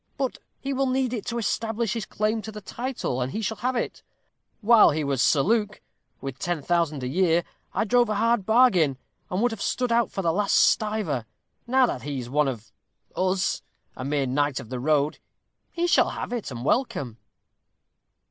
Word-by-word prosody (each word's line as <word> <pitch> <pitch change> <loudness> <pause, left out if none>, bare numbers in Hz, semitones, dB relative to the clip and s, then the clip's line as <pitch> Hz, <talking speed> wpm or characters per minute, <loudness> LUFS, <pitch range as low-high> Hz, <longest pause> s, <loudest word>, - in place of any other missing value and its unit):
"But 265 -2 -2 0.2
he 275 0 -3
will 270 0 +1
need 255 -1 0
it 230 -2 -4
to 235 -1 -2
establish 225 -1 -1
his 225 -3 -4
claim 215 +1 -1
to 220 +1 -7
the 210 - -8
title, 230 - -3
and 125 +1 -2
he 220 - -3
shall 220 +2 -2
have 255 +1 -1
it. 240 - -3 0.6
While 230 +1 +7
he 155 +1 -1
was 140 -3 0
Sir 140 - +4
Luke, 210 -1 +1 0.4
with 135 -1 -6
ten 175 -4 -2
thousand 165 -5 0
a - - -2
year, 170 +3 +2 0.3
I - - +2
drove 240 +1 +3
a 215 - 0
hard 230 0 +2
bargain, 190 - +4 0.3
and 185 +5 -1
would 245 - +3
have 225 -3 -6
stood 250 -2 -1
out 235 -1 +3
for 195 - -4
the 165 -1 +2
last 200 +2 +1
stiver. 210 - +2 0.4
Now 260 +1 +4
that 130 - -3
he 140 +2 -4
is 125 -1 -6
one 150 +1 +2
of 120 -4 -5 0.4
'us', 185 0 0 0.3
a - - -6
mere 140 0 0
Knight 145 +1 0
of 110 - -10
the 130 - -4
Road, 150 +2 +1 0.5
he 345 0 -1
shall 350 - +4
have - - -5
it 235 -4 -3
and 125 -1 -6
welcome." 180 - 0
200 Hz, 195 wpm, -25 LUFS, 145-235 Hz, 0.6 s, While